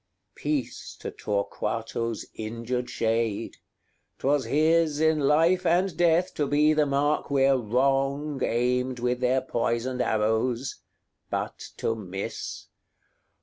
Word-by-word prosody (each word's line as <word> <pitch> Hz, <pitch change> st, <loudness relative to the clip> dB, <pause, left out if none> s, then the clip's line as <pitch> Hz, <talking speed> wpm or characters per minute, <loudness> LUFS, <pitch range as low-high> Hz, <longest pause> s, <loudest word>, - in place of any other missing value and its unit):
XXXIX. -, -, -52 dB
Peace 140 Hz, -5 st, -3 dB
to -, -, -6 dB
Torquato's 110 Hz, +2 st, -3 dB
injured 115 Hz, +3 st, -4 dB
shade! 115 Hz, -3 st, -1 dB, 0.6 s
'twas 140 Hz, -1 st, +1 dB
his 155 Hz, +3 st, +2 dB
In 160 Hz, -1 st, +3 dB
life 165 Hz, +6 st, +3 dB
and 175 Hz, +1 st, +2 dB
death 175 Hz, +2 st, +3 dB
to 145 Hz, -, -1 dB
be 150 Hz, +2 st, +4 dB
the 150 Hz, -1 st, +2 dB
mark 145 Hz, +2 st, +1 dB
where 135 Hz, -1 st, +4 dB
Wrong 135 Hz, +4 st, 0 dB
Aimed 125 Hz, +2 st, 0 dB
with 125 Hz, +1 st, -1 dB
their 130 Hz, +1 st, +2 dB
poisoned 120 Hz, +2 st, -1 dB
arrows 110 Hz, +4 st, 0 dB, 0.5 s
but -, -, -3 dB, 0.2 s
to -, -, 0 dB
miss. 95 Hz, -2 st, -6 dB
130 Hz, 115 wpm, -26 LUFS, 115-150 Hz, 0.6 s, be